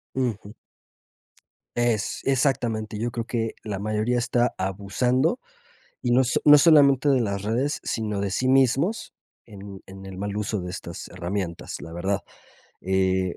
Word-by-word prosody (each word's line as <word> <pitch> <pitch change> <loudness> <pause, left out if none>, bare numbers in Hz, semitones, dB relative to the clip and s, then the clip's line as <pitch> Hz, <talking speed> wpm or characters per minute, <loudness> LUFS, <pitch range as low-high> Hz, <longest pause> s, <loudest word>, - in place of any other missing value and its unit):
Ujú. 115 -5 -2 1.2
Ex 120 -4 0
exactamente, 120 -5 0
yo 120 +2 -2
creo 115 -1 -4
que 115 -2 -2
la 105 -3 -4
mayoría 110 +4 0
está 120 0 +1
abusando, 125 - 0 0.6
y 120 - 0
no 125 +2 +5
s 130 -1 +2
no 150 -1 +9
solamente 145 -3 +6
de 135 -3 +4
las 100 -3 -2
redes, 125 +8 -1
sino 105 -3 -2
de 100 -1 -1
sí 130 +7 -1
mismos, 135 - +2 0.3
en 100 -2 -10
en 95 0 -11
el 95 -1 -8
mal 100 +1 -3
uso 105 -1 -2
de 90 0 -5
estas 90 0 -7
herramientas, 90 -1 -4
la 80 - -9
verdad, 95 +3 -1 0.6
eh, 95 -1 +1
110 Hz, 150 wpm, -25 LUFS, 95-125 Hz, 1.2 s, no